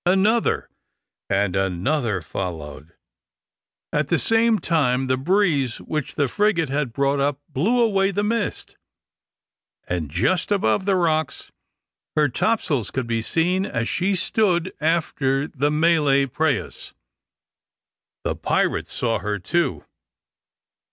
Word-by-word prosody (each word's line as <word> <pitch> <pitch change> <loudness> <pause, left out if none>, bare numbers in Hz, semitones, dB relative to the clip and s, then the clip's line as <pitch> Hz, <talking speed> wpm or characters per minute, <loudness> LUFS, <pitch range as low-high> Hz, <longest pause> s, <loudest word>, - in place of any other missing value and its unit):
Another 205 +5 +2 0.6
and 95 -1 +1
another 95 - 0
followed. 80 -3 -6 1.0
At 150 -1 +1
the 175 - +2
same 225 +2 +3
time 135 -9 +1
the 130 0 +1
breeze 145 - +1
which 150 -4 -4
the 145 - +1
frigate 195 -4 +1
had 140 -2 -1
brought 140 +3 0
up 140 0 0
blew 195 - +1
away 195 -4 +3
the 205 +1 -1
mist; 220 0 -2 1.1
and 85 -5 -3
just 125 - 0
above 190 - +1
the 200 -1 +2
rocks 160 -4 -1 0.6
her 150 -2 +3
topsails 145 - 0
could 130 -2 -3
be 115 -1 -1
seen 175 +9 +1
as 115 - -2
she 190 +2 +1
stood 185 -2 +1
after 145 -4 0
the 145 0 -1
Malay 150 -3 +3
prahus. 140 +2 -2 1.3
The - - -1
pirates - - 0
saw 115 -3 0
her 105 +2 -2
too. 90 - -1
150 Hz, 120 wpm, -22 LUFS, 120-185 Hz, 1.3 s, same